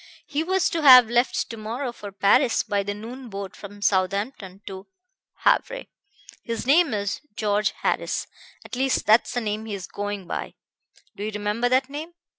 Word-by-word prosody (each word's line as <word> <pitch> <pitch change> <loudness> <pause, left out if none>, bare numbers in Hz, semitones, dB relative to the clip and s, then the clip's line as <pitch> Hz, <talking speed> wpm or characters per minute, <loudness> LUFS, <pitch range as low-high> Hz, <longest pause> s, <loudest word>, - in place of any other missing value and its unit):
He 295 0 -2
was 375 +2 +1
to 330 - -1
have 255 -5 +9
left 240 +1 +1
to 230 - -7
morrow 235 +4 -4
for 205 -4 -9
Paris 205 +6 +3
by 205 -2 0
the 205 +1 -4
noon 240 +4 -9
boat 195 -1 -6
from 205 0 -10
Southampton 195 +1 -1
to 190 -1 -8 0.6
Havre. - - +2 0.6
His 230 -1 -4
name 310 +3 +4
is 200 -1 -2
George 210 -1 +1
Harris - - 0 0.4
at - - -7
least 265 +1 0
that's 220 +3 +4
the 245 - 0
name 215 0 -3
he 215 -2 -4
is 190 -2 -6
going 205 -1 -5
by. - - -5 0.6
Do 205 - -6
you 215 - -2
remember 210 +3 -1
that 260 +1 +2
name?' 310 +5 -7
220 Hz, 175 wpm, -24 LUFS, 205-255 Hz, 0.6 s, have